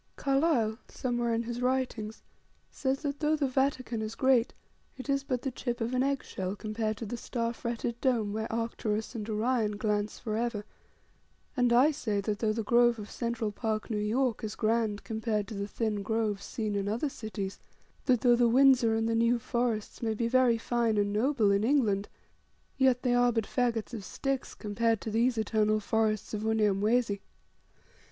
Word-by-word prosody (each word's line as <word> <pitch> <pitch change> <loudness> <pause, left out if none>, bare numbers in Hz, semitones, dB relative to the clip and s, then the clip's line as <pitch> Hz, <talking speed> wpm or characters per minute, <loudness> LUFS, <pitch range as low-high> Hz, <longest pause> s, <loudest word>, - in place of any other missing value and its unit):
Carlyle, 270 -6 +1
somewhere 240 -2 -1
in 230 0 0
his 240 +1 -4
writings, 250 -4 -1 0.5
says, 270 +1 -2
that 285 -1 -2
though 305 0 +2
the 290 -3 0
Vatican 260 -3 0
is 220 0 -4
great, 260 -3 +3 0.5
it 260 - -8
is 275 -1 +1
but 255 -3 -2
the 270 - -1
chip 240 -1 -3
of 230 +2 -2
an 255 - +2
eggshell 250 -8 -2
compared 215 0 -3
to 230 - -5
the 220 - -4
star 235 0 -2
fretted 235 0 -4
dome 230 -6 +1
where 220 +1 -3
Arcturus 225 -1 -2
and 220 -2 -5
Orion 215 -1 0
glance 210 0 -1
for 215 -3 -3
ever; 225 -3 -2 0.9
and 245 -2 +2
I 255 +6 +6
say 220 -9 -2
that, 205 +1 -2
though 220 -2 +1
the 225 +1 -2
grove 240 +2 +4
of 210 -1 -8
Central 235 -3 -2
Park, 215 +1 -3
New 210 - 0
York, 230 +3 0
is 215 - -4
grand 220 -2 0
compared 220 -2 -2
to - - -6
the 200 0 -3
thin 215 -1 -2
groves 215 -1 -1
seen 215 -3 -3
in 200 -1 -1
other 220 +3 -1
great 285 - -2
cities, 210 -4 -5 0.5
that 250 -3 +3
though 245 -2 +5
the 240 -1 +4
Windsor 255 -2 +5
and 225 0 0
the 230 - +1
New 230 +1 +3
Forests 235 -2 -2
may 220 -2 0
be 230 +2 0
very 250 -1 +4
fine 230 -1 0
and 205 0 +1
noble 225 -1 +2
in 200 +1 +2
England, 220 -6 +2 0.7
yet 260 -2 +3
they 250 -2 +2
are 245 0 +4
but 225 -2 0
fagots 240 -2 -1
of 215 -4 -5
sticks 270 +7 -3
compared 225 +1 0
to 220 - -4
these 235 +2 +2
eternal 215 0 +2
forests 215 0 0
of 210 - -2
Unyamwezi. 215 0 +2
230 Hz, 185 wpm, -30 LUFS, 215-250 Hz, 0.9 s, I